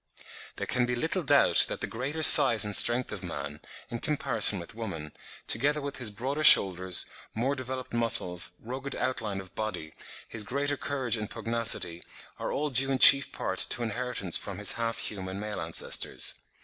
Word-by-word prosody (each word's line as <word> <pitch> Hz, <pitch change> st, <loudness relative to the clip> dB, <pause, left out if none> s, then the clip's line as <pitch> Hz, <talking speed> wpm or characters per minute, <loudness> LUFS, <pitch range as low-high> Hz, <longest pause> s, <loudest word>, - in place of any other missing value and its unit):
There -, -, -6 dB
can 125 Hz, -1 st, -2 dB
be 125 Hz, -, -3 dB
little 120 Hz, -, -3 dB
doubt -, -, +3 dB
that -, -, -6 dB
the -, -, -3 dB
greater 140 Hz, +7 st, -6 dB
size 125 Hz, -8 st, +9 dB
and 105 Hz, -1 st, +2 dB
strength 120 Hz, +1 st, +4 dB
of 105 Hz, -, -6 dB
man, 75 Hz, -4 st, -8 dB, 0.3 s
in 120 Hz, -, -6 dB
comparison 120 Hz, -9 st, +3 dB
with 85 Hz, -, -11 dB
woman, 95 Hz, -10 st, -8 dB, 0.4 s
together 145 Hz, +6 st, -1 dB
with 140 Hz, -1 st, -7 dB
his 125 Hz, -4 st, 0 dB
broader 130 Hz, +9 st, -5 dB
shoulders, 95 Hz, -, +4 dB, 0.3 s
more 125 Hz, +5 st, -2 dB
developed 130 Hz, -1 st, -8 dB
muscles, 100 Hz, -7 st, -1 dB
rugged 135 Hz, +3 st, -8 dB
outline 110 Hz, -6 st, -5 dB
of 95 Hz, -2 st, -13 dB
body, 90 Hz, -8 st, -7 dB, 0.3 s
his 110 Hz, -, -1 dB
greater 140 Hz, +5 st, -3 dB
courage 130 Hz, -5 st, -4 dB
and 105 Hz, -1 st, -7 dB
pugnacity, 115 Hz, -7 st, -2 dB, 0.4 s
are -, -, -5 dB
all 150 Hz, 0 st, -4 dB
due 135 Hz, +1 st, +2 dB
in 135 Hz, -, -1 dB
chief 140 Hz, +1 st, +5 dB
part -, -, -5 dB
to 120 Hz, -, -3 dB
inheritance 115 Hz, -5 st, -2 dB
from 100 Hz, -2 st, -9 dB
his 105 Hz, -1 st, +3 dB
half 115 Hz, -1 st, -4 dB
human 95 Hz, -1 st, -6 dB
male 105 Hz, -2 st, -7 dB
ancestors. 80 Hz, +1 st, 0 dB
115 Hz, 175 wpm, -26 LUFS, 100-130 Hz, 0.4 s, size